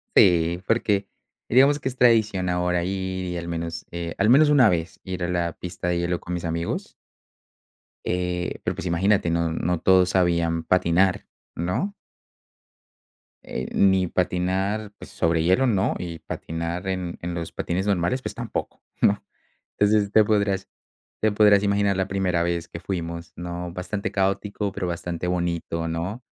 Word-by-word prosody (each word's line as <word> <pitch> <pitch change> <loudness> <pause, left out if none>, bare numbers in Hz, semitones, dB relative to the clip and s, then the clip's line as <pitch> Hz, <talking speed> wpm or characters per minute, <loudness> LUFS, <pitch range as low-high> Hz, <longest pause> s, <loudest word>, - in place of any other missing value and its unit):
Sí, 85 -1 +4
porque 105 -3 +1 0.4
digamos 140 +4 +5
que 135 - -4
es 130 - -3
tradición 110 -7 +3
ahora 90 0 +1
ir 95 0 -3
y 90 -1 -3
al 85 0 -5
menos, 85 0 -4
eh, 85 -1 -5
al 100 +2 +3
menos 150 +4 +6
una 135 -6 +6
vez 85 -2 -1
ir 95 -1 -4
a 85 - -1
la 85 -2 -1
pista 90 +1 -6
de 85 -1 +1
hielo 85 0 -1
con 90 - -6
mis 85 0 -3
amigos. 85 +1 -3 1.1
Eh, 90 0 -2
pero, - - -1
pues, - - -6
imagínate. 90 +2 +2
No 85 0 +1
no 85 +1 -1
todos 95 +1 +4
sabían 85 -2 +1
patinar, 90 +2 +2 0.3
¿no? 90 - -2 1.5
Eh, 65 - -5
ni 95 -2 +4
patinar 95 +4 -1
sobre 80 0 0
hielo, 95 +10 +3
no. 100 -3 +1
Y 85 -2 -6
patinar 85 +3 -5
en 90 -2 -3
en 85 0 -4
los 85 -1 -4
patines 95 +4 -2
normales, 100 +7 +1
pues, - - -6
tampoco, - - -5 0.2
¿no? 100 0 +3 0.6
Entonces 105 -1 +3
te 110 - +7
podrás 100 -2 0 0.5
te 110 -1 +2
podrás 105 -1 +5
imaginar 100 -1 +2
la 95 0 0
primera 95 -3 0
vez 85 -1 -2
que 85 - -8
fuimos, 85 -3 -5
¿no? 85 0 -5
Bastante 90 +3 -4
caótico, 100 +1 -1
pero 95 -2 -3
bastante 85 0 -4
bonito, 85 -2 -2
¿no? 90 +9 -4
90 Hz, 155 wpm, -24 LUFS, 85-100 Hz, 1.5 s, te